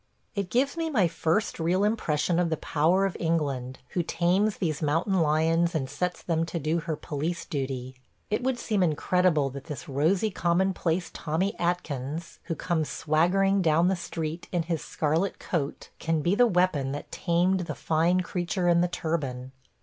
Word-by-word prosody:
It 200 -4 -2
gives 270 +5 +1
me 325 -1 -1
my 215 - +3
first 165 +5 0
real 175 +4 +2
impression 175 -6 +1
of 175 -1 +2
the 160 - 0
power 170 +8 +2
of 195 - -2
England, 140 -6 -1
who 180 - 0
tames 180 +5 +1
these 155 -5 -1
mountain 165 +6 +1
lions 165 +2 +2
and 135 -4 0
sets 175 +6 -3
them 165 -2 0
to 170 - -3
do 160 +2 0
her 160 -1 -3
police 155 +3 -3
duty,. 130 -4 -4 0.4
It 215 - +1
would 260 0 0
seem 215 -4 0
incredible 165 -3 +2
that 140 +1 -8
this 165 +2 -7
rosy 165 +10 +1
commonplace 180 -1 0
Tommy 175 +7 -1
Atkins 165 -3 -3
who 165 - -2
comes 160 -4 -1
swaggering 190 +6 +2
down 165 +1 +3
the 190 - +2
street 165 -1 -5
in 175 -2 0
his 165 -2 -2
scarlet 160 +5 0
coat 150 -5 -3
can 160 -1 0
be 175 - +2
the 245 +4 +5
weapon 175 - +1
that 145 - -7
tamed 180 +2 +1
the - - -4
fine 165 +3 +2
creature 180 0 -2
in 170 0 +5
the 175 - +3
turban. 140 -7 -3
170 Hz, 175 wpm, -27 LUFS, 155-185 Hz, 0.4 s, the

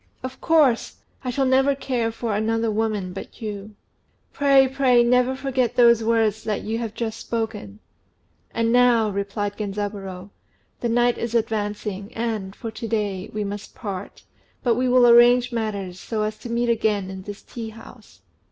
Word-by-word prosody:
"Of 255 0 -7
course! 300 -8 +3 0.3
I 255 - -3
shall 270 +2 0
never 265 +2 +3
care 245 -4 -1
for 225 -1 -3
another 225 +1 0
woman 210 -4 -1
but 190 - -9
you." 210 -1 -6 0.6
"Pray, 275 -3 +5
pray, 260 -2 +3
never 250 +2 +3
forget 260 -3 -1
those 235 -2 +5
words 220 -1 +1
that 215 -2 -2
you 225 +2 -2
have 225 -2 -5
just 225 -1 -3
spoken." 220 -3 -4 0.7
"And 230 0 0
now," 240 -3 +4
replied 200 +1 -3
Genzaburô, 200 -2 -5 0.5
"the 240 - -1
night 240 +1 +2
is 235 0 -3
advancing, 210 -2 -2
and, 220 -4 -3
for 225 - -6
to 230 - -6
day, 205 -4 -2
we 210 0 -3
must 205 0 -6
part; 200 -3 -7 0.4
but 240 - +3
we 250 +2 0
will 250 0 +6
arrange 240 +1 +6
matters, 200 -6 -3
so 215 +1 -3
as 215 0 -2
to 240 - -8
meet 235 +1 0
again 210 -4 0
in 190 0 -7
this 205 +2 -9
tea 230 -2 -7
house. 220 +1 -15
225 Hz, 165 wpm, -23 LUFS, 205-240 Hz, 0.7 s, will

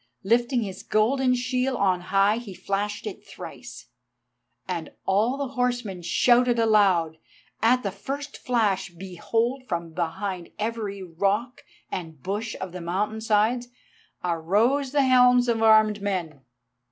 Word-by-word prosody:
Lifting 240 +4 +2
his 190 -2 -6
golden 250 +4 +2
shield 255 +1 -1
on 185 -2 +2
high 195 +4 +2
he 220 -6 -8
flashed 205 +3 -3
it - - -6
thrice, - - -10 0.8
and - - -4
all 215 +7 +2
the 280 -2 -3
horsemen 245 -7 -2
shouted 240 +7 +3
aloud. 195 -8 +3 0.4
At 250 +3 +3
the 200 - -2
first 280 +8 -6
flash, 210 -7 0
behold, 225 +9 -2
from 170 -2 -3
behind 180 +1 -3
every 210 -3 -3
rock 200 +8 -1 0.3
and 160 -4 -6
bush 210 - -3
of 185 - -5
the 180 0 -7
mountain 205 +6 -2
sides 220 +3 +1 0.6
arose 205 - +1
the 285 -1 +3
helms 250 -1 +5
of 230 -2 +1
armed 215 -2 +5
men. 175 -8 -3
215 Hz, 130 wpm, -25 LUFS, 190-245 Hz, 0.8 s, helms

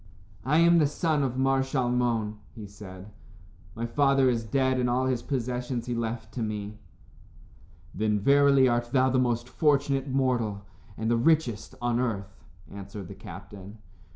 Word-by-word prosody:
"I 150 +4 +3
am 170 +1 +5
the 150 - +4
son 155 0 0
of 130 -2 -1
Mar 135 0 +2
Shalmon," 120 -5 0 0.2
he 110 -3 -8
said. 100 -1 -11 0.6
"My 115 - -3
father 135 +1 +3
is 115 -2 -2
dead, 130 +3 +1
and 125 -1 +1
all 125 +2 +1
his 130 -2 0
possessions 125 -2 -3
he 125 - -3
left 115 -1 -4
to 125 - -4
me." 105 -1 -4 1.1
"Then, 105 0 0
verily, 140 +3 +5
art 120 -1 0
thou 130 -1 +3
the 130 - +2
most 120 -1 0
fortunate 140 -1 +1
mortal, 120 -6 0 0.3
and 110 +1 -1
the 120 - +3
richest, 135 -5 +1
on 120 0 +1
earth," 100 -6 -3 0.3
answered 100 -1 -8
the - - -7
captain. 100 +1 -11
120 Hz, 155 wpm, -27 LUFS, 110-135 Hz, 1.1 s, am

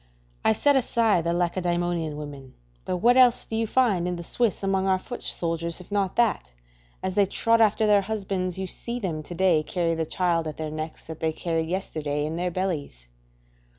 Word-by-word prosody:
I 110 - +4
set 285 - +3
aside 230 -8 +2
the 170 - +1
Lacedaemonian 175 -2 -1
women, 140 -3 -9 0.3
but 180 - -1
what 240 +7 +4
else 250 -2 +5
do 225 - -5
you 225 0 0
find 210 -8 +2
in 180 - -1
the 170 - -6
Swiss 220 +2 -1
among 195 0 +1
our 190 -1 +3
foot 245 +6 -8
soldiers, 170 0 -2
if 180 - -13
not 200 -2 0
that, 230 - +1 0.5
as 185 0 -1
they 200 0 +3
trot 230 +4 +2
after 220 0 +4
their 205 -1 +5
husbands, 190 -3 -3
you 190 - -2
see 235 +6 -5
them 170 -8 -3
to 175 +3 -8
day 175 -3 +3
carry 165 +1 -1
the 160 -1 -2
child 170 -3 0
at 155 - -6
their 155 -1 -4
necks 155 +1 -6
that 160 -1 -8
they 160 0 0
carried 165 0 -2
yesterday 150 -6 -2
in 155 +1 -3
their 180 +1 -1
bellies? 160 - -4
180 Hz, 200 wpm, -25 LUFS, 160-200 Hz, 0.5 s, else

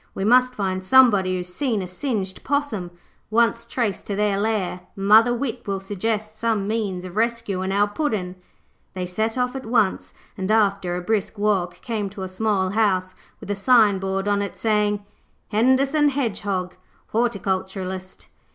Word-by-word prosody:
We 195 - -3
must 250 +3 +4
find 185 -2 -2
somebody 205 -5 +5
who - - 0
has 180 0 -6
seen 225 -4 -1
a - - -6
singed 190 -1 -3
possum. 280 -11 -1 0.4
Once 235 +1 +2
traced 230 -5 -2
to 200 - -2
their 205 -1 +1
lair, 205 -4 -1 0.2
mother 215 +4 +5
wit 240 -1 -3
will 195 -1 -1
suggest 215 +2 -3
some 220 -4 0
means 205 -5 -2
of 180 0 -9
rescuing 220 -4 -1
our 205 +1 +3
Puddin'.' 205 -7 -2 0.6
They 185 -1 -2
set 220 +6 -2
off 250 +1 0
at 265 - -5
once, 220 -4 0 0.2
and, 190 +1 -4
after 200 -4 +2
a 180 - -3
brisk 210 +2 -1
walk, 200 -4 0
came 215 -4 -3
to 195 0 -7
a - - -3
small 190 -1 0
house 190 -4 +1 0.3
with 205 - -6
a - - 0
signboard 195 -3 +3
on 205 0 +2
it 200 - -5
saying, 210 -2 +1 0.4
'Henderson 270 +6 +3
Hedgehog, 200 -9 -2 0.4
Horticulturist'. 190 -4 -2
205 Hz, 160 wpm, -23 LUFS, 190-230 Hz, 0.6 s, somebody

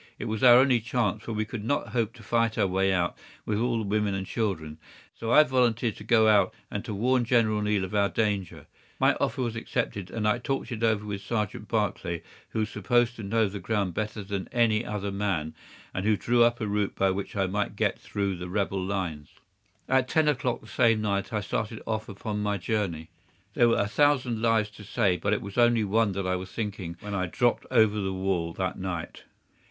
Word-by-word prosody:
It - - -5
was 110 -1 -3
our 125 -2 +8
only 130 -2 +5
chance, 110 -3 -1
for 115 - -6
we 110 0 -1
could 110 -1 -6
not 120 0 -1
hope 115 -1 -1
to 115 - -14
fight 115 +1 +1
our 105 - +3
way 95 +1 +1
out 90 -2 0 0.3
with 105 -1 -1
all 120 0 +1
the 110 - -1
women 105 -1 0
and 95 0 -3
children, 80 -9 -3 0.3
so 115 0 -4
I 150 - +8
volunteered 120 -4 +1
to - - -9
go 110 0 +4
out 100 -3 +4 0.2
and 105 - -3
to 110 - -4
warn 125 +4 +2
General 110 -3 +2
Neill 105 -2 +1
of 95 - -5
our 100 -1 +3
danger. 100 -2 -2 0.3
My - - +4
offer 130 - 0
was 115 -2 -2
accepted, 115 -5 -3
and 110 +1 -2
I 105 +3 +2
talked 135 -1 -3
it 115 -2 -4
over 110 -2 +1
with 100 -1 -4
Sergeant 105 0 -3
Barclay, 95 -6 -1 0.3
who - - -6
was 110 - -1
supposed 120 +4 +1
to - - -6
know 110 +2 +2
the 100 +1 -6
ground 100 -1 -1
better 110 +1 -3
than 100 -1 -4
any 115 -2 +2
other 100 -2 -3
man, 100 -6 -1 0.4
and 95 - -2
who 105 0 +3
drew 120 +3 +2
up 120 0 +2
a 110 - -2
route 105 -1 -1
by 95 0 +2
which 100 +2 -4
I 100 -1 +1
might 105 +2 -2
get 105 0 0
through 100 -3 -2
the 90 +1 -6
rebel 95 0 -1
lines. 90 -7 -3 0.6
At 130 -1 +2
ten 155 +3 +2
o'clock 130 -4 0
the - - -16
same 115 -1 +3
night 100 -2 -1
I 105 -2 -1
started 110 +2 -3
off 110 0 -3
upon 105 +1 -4
my 105 -1 0
journey. 90 -5 -2 0.4
There 120 +1 +4
were 115 - +3
a 100 - +1
thousand 125 -2 +2
lives 110 -2 +2
to 105 0 -12
save, 100 -3 0
but 100 - +1
it 105 - -1
was 100 +2 -8
of 120 -1 +7
only 120 -2 +2
one 105 0 +2
that 95 0 -3
I 90 0 0
was 95 0 -8
thinking 95 -6 -4
when 105 0 -6
I 95 -2 -1
dropped 120 +7 0
over 110 -1 +4
the 95 -1 -1
wall 95 -3 -1
that 95 0 -3
night. 90 -3 -5
105 Hz, 225 wpm, -27 LUFS, 95-115 Hz, 0.6 s, our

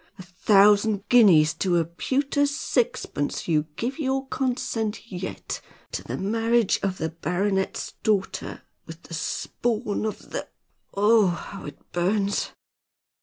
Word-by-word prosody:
A 185 - -9
thousand 200 +2 +4
guineas 175 -11 +6
to 175 +2 0
a 165 - +2
pewter 275 - 0
sixpence 245 - -1
you 155 -2 +2
give 255 - -3
your 270 -2 -1
consent 230 -4 -2
yet 185 0 -5 0.3
to - - -4
the - - -4
marriage 225 +2 +2
of 190 -1 -1
the 160 - -2
baronet's 190 +4 -1
daughter 205 -3 -1 0.2
with 165 +1 -10
the - - -11
spawn 215 +6 -2
of 215 - -7
the - - -4 0.5
oh, 210 +1 +5
how 175 +3 -5
it 145 -1 -8
burns!" 195 +3 0
200 Hz, 125 wpm, -25 LUFS, 175-230 Hz, 0.5 s, guineas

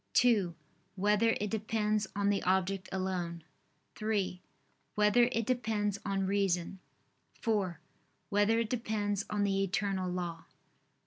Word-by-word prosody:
(2) 205 -9 +4 0.4
Whether 210 +3 +3
it 210 0 -2
depends 215 -1 0
on 200 0 +2
the 200 - 0
object 190 +1 0
alone? 180 -3 -2 0.5
(3) 205 -4 -1 0.5
Whether 210 +3 +4
it 230 -3 0
depends 215 -5 0
on 195 -1 0
reason? 190 -2 0 0.6
(4) 200 -8 0 0.5
Whether 205 +2 +3
it 230 -2 0
depends 215 -4 -1
on 205 -1 0
the 195 -1 +1
eternal 195 -1 -1
law? 175 -2 -4
200 Hz, 120 wpm, -32 LUFS, 190-215 Hz, 0.6 s, 2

